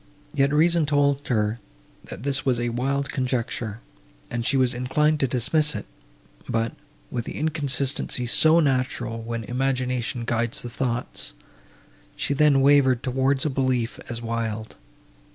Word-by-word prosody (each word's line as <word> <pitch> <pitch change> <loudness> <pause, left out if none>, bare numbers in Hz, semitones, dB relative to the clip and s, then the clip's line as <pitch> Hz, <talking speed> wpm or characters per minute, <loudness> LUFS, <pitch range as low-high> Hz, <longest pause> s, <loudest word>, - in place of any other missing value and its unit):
Yet 140 0 +2
reason 165 +1 +3
told 145 -1 +2
her, 110 -1 0 0.5
that - - -8
this 135 -1 0
was 130 -4 +1
a 120 0 -1
wild 135 +3 -1
conjecture, 120 -4 -2 0.5
and 120 -1 -2
she 135 +3 +2
was 130 -2 +3
inclined 150 +5 +1
to 135 - +2
dismiss 150 +5 +2
it; - - -5 0.6
but, 115 0 0 0.4
with 120 - -3
the - - -6
inconsistency 140 -4 0
so 160 +7 +5
natural, 130 -5 0
when 115 0 -4
imagination 125 0 -1
guides 120 0 -1
the 120 - -5
thoughts, 120 - -3 0.8
she - - -1
then 140 -1 +4
wavered 135 -3 +4
towards 130 +1 +1
a - - +2
belief 130 -3 0
as 120 0 -5
wild. 115 -1 -3
130 Hz, 140 wpm, -24 LUFS, 120-140 Hz, 0.8 s, so